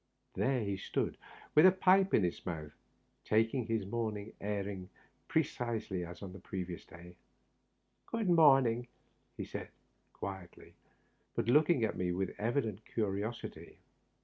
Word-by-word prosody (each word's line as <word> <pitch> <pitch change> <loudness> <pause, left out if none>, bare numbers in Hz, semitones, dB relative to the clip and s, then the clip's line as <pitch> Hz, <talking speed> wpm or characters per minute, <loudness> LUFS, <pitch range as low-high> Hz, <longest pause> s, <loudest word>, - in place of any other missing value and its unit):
There 130 -2 +1
he 100 -2 -2
stood, - - -2 0.4
with 155 +4 +8
a - - +8
pipe 190 +1 +4
in 105 - +4
his 90 - -1
mouth, 75 -4 -5 0.5
taking 115 +2 +2
his 115 -4 0
morning 110 0 -3
airing 100 -2 -3 0.4
precisely 115 - -1
as 85 +3 -8
on 95 -2 -7
the 95 - -9
preceding 90 -2 -5
day. 85 +1 -12 0.5
" - - -46
Good 230 -3 0
morning," 135 -8 +5 0.6
said - - -6
he, - - -30 0.4
quietly, 95 -3 -8 0.6
but - - 0
looking 150 +1 +5
at 110 - 0
me 90 -1 0
with 95 +1 -2
evident 110 -2 -1
curiosity. 105 +1 -3
110 Hz, 135 wpm, -34 LUFS, 95-125 Hz, 0.6 s, with